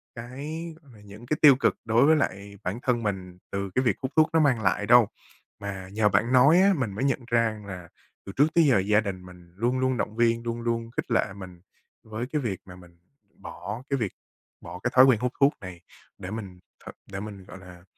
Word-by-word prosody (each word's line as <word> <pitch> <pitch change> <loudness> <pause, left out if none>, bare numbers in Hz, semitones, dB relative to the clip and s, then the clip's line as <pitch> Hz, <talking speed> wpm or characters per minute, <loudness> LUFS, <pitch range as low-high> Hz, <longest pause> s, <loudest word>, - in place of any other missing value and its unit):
cái 140 +8 -7 0.2
mà 125 -7 -18
những 105 +3 -13
cái 150 +4 -1
tiêu 145 -4 +8
cực 135 - +1
đối 115 +4 +4
với 160 - +5
lại 100 -8 -3
bản 100 +7 -3
thân 120 -2 0
mình 95 -3 -4
từ 100 0 -3
cái 130 - +2
việc 120 -7 +2
hút 130 +2 -3
thuốc 155 0 +4
nó 165 - +4
mang 135 -7 +2
lại 100 +1 0
đâu. 120 -2 +6 0.5
Mà 95 -2 -6
nhờ 105 0 +2
bạn 105 +5 +1
nói 140 +7 +6
á, 200 0 +5
mình 130 -7 -2
mới 115 - -3
nhận 135 -2 +1
ra 115 -2 +1
là 90 -3 -8 0.4
từ 100 - -7
trước 145 - +5
tới 170 - +6
giờ 130 -9 +4
gia 105 +2 +2
đình 95 -3 -6
mình 90 -1 -15
luôn 120 +5 0
luôn 130 -1 0
động 110 - -3
viên, 115 0 +1
luôn 115 0 -4
luôn 115 0 -2
khích 120 - -5
lệ 105 -3 +1
mình 90 -3 -11 0.4
với 110 +2 -5
cái 150 - 0
việc 100 -7 -3
mà 90 - -12
mình 90 -1 -17 0.4
bỏ 105 +8 -8
cái 140 - +1
việc 110 -6 -3 0.5
bỏ 90 +2 -9
cái - - 0
thói 130 +1 +9
quen 125 -5 +4
hút 125 +1 -1
thuốc 140 +1 +4
này. 90 -2 -9 0.4
Để 90 - -8
mình 100 -5 -7 0.3
th - - -8 0.2
để 95 - -5
mình, 100 -2 -8
gọi 95 - -11
là, 90 -1 -14
110 Hz, 230 wpm, -26 LUFS, 95-125 Hz, 0.5 s, thói